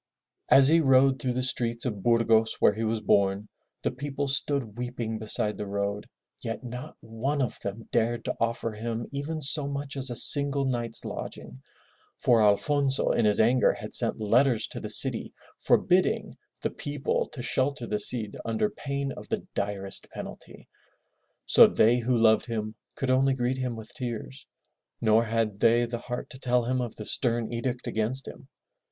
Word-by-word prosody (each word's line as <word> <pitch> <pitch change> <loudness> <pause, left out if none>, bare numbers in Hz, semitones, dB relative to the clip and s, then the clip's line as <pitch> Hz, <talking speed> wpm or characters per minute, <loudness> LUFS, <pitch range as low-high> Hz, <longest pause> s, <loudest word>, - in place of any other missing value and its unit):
As 135 -1 +8
he 165 +3 +5
rode 135 -2 +4
through 125 -1 -1
the 130 +1 -1
streets 120 -2 0
of 105 -6 -3
Burgos, 115 0 +3
where - - +3
he 110 +2 -4
was 110 0 -1
born, 100 +1 +1 0.4
the - - 0
people 140 +2 -4
stood 135 -5 -1
weeping 120 -2 -4
beside 105 -1 -1
the 105 - -4
road, 100 +1 -3 0.3
yet 115 +2 -5
not 125 +1 -8
one 115 +6 -3
of 125 -5 -2
them 100 +3 -6
dared 115 +1 0
to - - -2
offer 115 0 -1
him 115 +2 -4
even 150 +3 -4
so 145 0 0
much 140 0 -5
as 135 -1 -4
a 120 - -4
single 140 +2 +4
night's 120 -3 0
lodging, 65 -2 -7 0.6
for 120 -3 +3
Alfonso 135 +6 +2
in 115 - +1
his 105 -1 +3
anger 120 +3 +4
had - - -9
sent - - +3
letters 115 +3 +2
to - - -6
the - - -6
city - - +1 0.2
forbidding - - +2 0.3
the - - -1
people 145 -1 -2
to 125 - -7
shelter 130 0 0
the 105 -2 -2
Cid 105 0 0
under 115 - -1
pain 140 -3 -4
of - - -10
the - - -3
direst 100 -1 -4
penalty. - - -10 0.8
So - - +7
they 120 +3 +3
who 120 +1 0
loved 110 +1 +4
him 110 -2 -3 0.2
could 130 -1 -1
only 135 +1 +3
greet 130 +1 -1
him 125 -2 -2
with 110 -1 -10
tears, 115 - -6 0.5
nor 110 +1 +3
had 110 -2 -1
they 120 +2 +4
the 120 0 -5
heart 125 +1 -5
to 130 - -9
tell 125 -2 +1
him 130 +1 0
of 120 -3 -5
the 105 - -8
stem 120 -1 0
edict 120 +1 -3
against 115 +5 -2
him. - - -11
120 Hz, 175 wpm, -27 LUFS, 110-130 Hz, 0.8 s, As